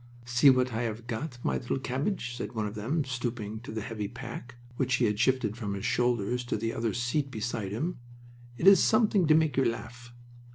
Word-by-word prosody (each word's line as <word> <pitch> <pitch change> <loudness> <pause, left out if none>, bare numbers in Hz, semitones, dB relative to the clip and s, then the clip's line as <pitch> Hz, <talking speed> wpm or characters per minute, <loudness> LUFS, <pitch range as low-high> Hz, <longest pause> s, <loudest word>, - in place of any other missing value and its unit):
"See 120 +3 +5
what 130 -1 +3
I 110 - -1
have 115 -1 -3
got, 120 +3 -4
my - - +1
little 120 - -2
cabbage," 130 0 -2
said - - -5
one 110 -2 -1
of 105 - -4
them, 130 +9 -1
stooping 120 -4 -4
to 120 - -9
the 110 0 -3
heavy 105 -2 -4
pack 120 0 -8 0.2
which 130 +1 +1
he 125 - +2
had 105 -1 0
shifted 120 -4 +2
from 105 -4 -3
his 100 +2 -5
shoulders 120 -1 +1
to - - -1
the 115 0 -2
other 115 -1 -1
seat 130 +4 0
beside 110 -4 -3
him. 155 - -3 0.6
"It - - -2
is 195 0 +9
something 210 -6 +3
to 155 - +6
make 160 -3 +2
you 135 - +4
laugh." 120 +1 -4
120 Hz, 210 wpm, -29 LUFS, 110-130 Hz, 0.6 s, is